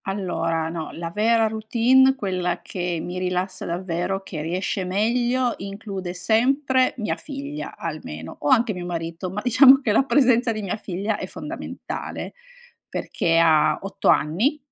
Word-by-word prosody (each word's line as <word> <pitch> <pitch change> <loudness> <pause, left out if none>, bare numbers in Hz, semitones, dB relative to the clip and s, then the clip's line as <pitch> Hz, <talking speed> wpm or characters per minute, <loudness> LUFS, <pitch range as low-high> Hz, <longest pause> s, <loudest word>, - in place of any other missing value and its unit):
Allora, 165 -4 -1
no. 165 -1 -5
La 165 0 -5
vera 225 +4 +3
routine, 235 +5 +3
quella 185 -6 -2
che 175 -2 -3
mi 180 +2 -5
rilassa 185 +1 -2
davvero, 180 +2 -2
che 160 -5 -6
riesce 180 +4 -2
meglio, 240 +6 +1
include 195 -2 -6
sempre 255 +7 +2
mia 215 -3 -1
figlia 285 +1 -7
almeno, 80 - -6
o 145 - -3
anche 225 +6 +4
mio 180 -1 -6
marito, 170 +1 -4
ma 200 +3 -4
diciamo 260 +2 +7
che 230 - 0
la 215 - +5
presenza 250 -4 +3
di 215 -1 -4
mia 195 - -2
figlia 200 +2 -3
è - - -4
fondamentale, - - -6 0.6
perché 165 0 0
ha 160 -2 +4
8 195 0 -4
anni 205 - +3
195 Hz, 145 wpm, -23 LUFS, 175-235 Hz, 0.6 s, diciamo